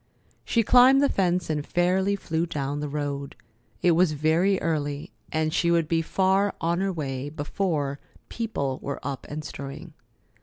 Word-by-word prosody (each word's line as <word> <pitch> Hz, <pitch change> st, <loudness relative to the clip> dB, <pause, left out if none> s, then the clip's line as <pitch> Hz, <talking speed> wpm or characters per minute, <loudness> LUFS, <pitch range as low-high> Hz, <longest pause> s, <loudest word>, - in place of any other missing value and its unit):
She 230 Hz, -, +2 dB
climbed 255 Hz, +4 st, +7 dB
the 280 Hz, -, +3 dB
fence 180 Hz, -2 st, +1 dB
and 150 Hz, -2 st, -1 dB
fairly 185 Hz, +5 st, +1 dB
flew 165 Hz, -3 st, -2 dB
down 145 Hz, -2 st, -3 dB
the 150 Hz, 0 st, -3 dB
road. 140 Hz, -1 st, -4 dB, 0.5 s
It 175 Hz, -, +5 dB
was 170 Hz, -1 st, +3 dB
very 165 Hz, +6 st, +2 dB
early, 145 Hz, -3 st, -2 dB, 0.2 s
and 155 Hz, 0 st, 0 dB
she 170 Hz, -1 st, +2 dB
would 170 Hz, -2 st, +2 dB
be 165 Hz, +1 st, +1 dB
far 190 Hz, +4 st, +1 dB
on 170 Hz, +1 st, 0 dB
her 195 Hz, 0 st, 0 dB
way 140 Hz, -5 st, -4 dB
before 145 Hz, -2 st, -2 dB, 0.3 s
people 140 Hz, -, -3 dB
were 140 Hz, -, -4 dB
up 140 Hz, -2 st, -4 dB
and 150 Hz, +1 st, -5 dB
stirring. 140 Hz, +5 st, -8 dB
160 Hz, 160 wpm, -26 LUFS, 145-185 Hz, 0.5 s, climbed